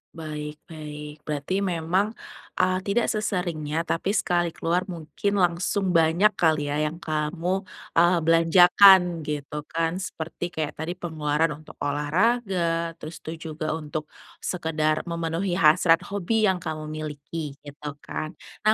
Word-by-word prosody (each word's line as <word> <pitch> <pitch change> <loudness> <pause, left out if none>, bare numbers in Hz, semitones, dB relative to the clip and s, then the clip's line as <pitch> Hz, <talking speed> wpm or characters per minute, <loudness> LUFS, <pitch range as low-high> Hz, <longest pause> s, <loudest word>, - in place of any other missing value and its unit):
Baik 150 -2 -6 0.2
baik. 150 -1 -7 0.2
Berarti 150 +6 -1
memang, 185 +3 0 0.4
eee, 185 0 +2
tidak 225 +4 +2
seseringnya, 170 -7 -1
tapi 170 +2 -1
sekali 175 -2 +2
keluar 175 +3 0
mungkin 175 +3 -3
langsung 180 +2 +1
banyak 170 +5 +4
kali 155 -3 +2
ya, - - 0
yang 165 +3 -7
kamu, 170 +5 -1 0.3
eee, 175 +1 +5
belanjakan 175 +4 +7 0.3
gitu 150 -1 -4
kan? 165 0 0 0.2
Seperti 160 +2 -5
kayak 155 -2 -2
tadi 165 +3 -3
pengeluaran 160 -2 0
untuk 155 - -14
olahraga, 170 +2 +1
terus 160 0 -9
tuh 160 - -6
juga 155 -1 -4
untuk 155 -1 -5 0.3
sekedar 155 -3 -1
memenuhi 170 +2 -2
hasrat 165 +1 +5
hobi 205 +2 +1
yang 185 -3 0
kamu 155 -1 -4
miliki, 150 -1 -6
gitu 145 +1 -8
kan? 155 +2 -5 0.3
Nah 215 +1 +5
165 Hz, 130 wpm, -25 LUFS, 155-180 Hz, 0.4 s, belanjakan